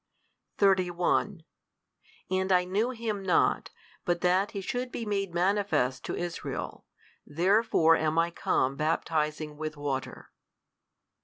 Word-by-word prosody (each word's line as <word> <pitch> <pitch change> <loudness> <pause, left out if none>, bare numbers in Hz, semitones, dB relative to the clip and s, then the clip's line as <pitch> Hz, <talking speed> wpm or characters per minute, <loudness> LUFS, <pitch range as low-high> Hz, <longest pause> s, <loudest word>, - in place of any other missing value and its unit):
31 185 -1 +2 0.9
And 190 0 0
I 180 -1 +5
knew 200 +7 0
Him 225 -5 -3
not, 185 -3 +2 0.3
but 175 -1 0
that 185 +3 +2
He 200 - -5
should 245 +6 -3
be 230 - -4
made 200 -3 -1
manifest 180 -9 +1
to - - -3
Israel, 175 -1 -5 0.4
therefore 175 0 +3
am 155 0 0
I 165 +1 +2
come 135 -5 0
baptizing 155 0 -1
with 155 0 -5
water. 140 -2 -4
180 Hz, 120 wpm, -28 LUFS, 155-200 Hz, 0.9 s, I